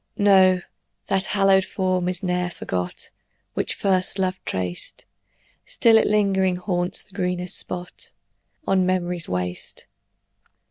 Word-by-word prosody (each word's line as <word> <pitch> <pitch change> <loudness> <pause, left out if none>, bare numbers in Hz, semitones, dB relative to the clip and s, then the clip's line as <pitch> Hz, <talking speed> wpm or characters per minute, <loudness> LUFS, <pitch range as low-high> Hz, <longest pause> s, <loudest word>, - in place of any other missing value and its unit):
No, 190 -3 +5 0.5
that 195 -1 +1
hallowed 195 -1 +3
form 185 -2 -1
is 180 +1 -3
ne'er 180 -1 0
forgot 90 - -5 0.4
Which - - -2
first 185 0 +1
love 185 -1 -1
traced; 90 -1 -3 0.6
Still 230 -1 +4
it - - +1
lingering 195 -3 +2
haunts 180 -1 -1
the 195 - -17
greenest 180 -2 -2
spot 175 0 -5 0.5
On 190 -5 +2
memory's 180 -2 0
waste. 90 -1 -4
185 Hz, 120 wpm, -23 LUFS, 180-190 Hz, 0.6 s, No